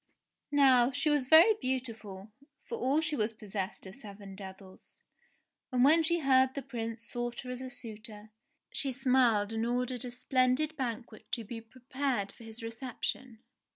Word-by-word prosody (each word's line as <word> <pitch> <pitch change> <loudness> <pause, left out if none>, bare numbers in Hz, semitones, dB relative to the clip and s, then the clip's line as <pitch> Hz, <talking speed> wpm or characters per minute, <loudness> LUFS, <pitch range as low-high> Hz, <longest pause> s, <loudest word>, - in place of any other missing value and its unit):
Now 260 -4 +6
she 300 +3 0
was 290 -4 +1
very 330 +9 +8
beautiful, 225 -6 -4 0.3
for - - -5
all 300 - +1
she 320 -2 0
was 220 -2 0
possessed 200 -3 -4
of 190 - -9
seven 200 -4 -10
devils, 190 -1 -12 0.7
and 250 -1 +3
when 315 +5 +6
she 340 +1 +1
heard 260 -1 +4
the 280 - -3
Prince 230 -3 -5
sought 240 0 -3
her 250 - -7
as 250 0 -5
a 260 - -5
suitor, 220 -3 -7 0.4
she 275 - 0
smiled 245 -5 +3
and 225 0 -1
ordered 245 +1 -1
a 250 - -4
splendid 255 +4 +1
banquet 235 -4 -5
to 235 - -1
be 225 +2 -7
prepared 255 -2 -3
for - - -15
his 225 +1 -10
reception. 235 0 -5
245 Hz, 160 wpm, -31 LUFS, 220-265 Hz, 0.7 s, very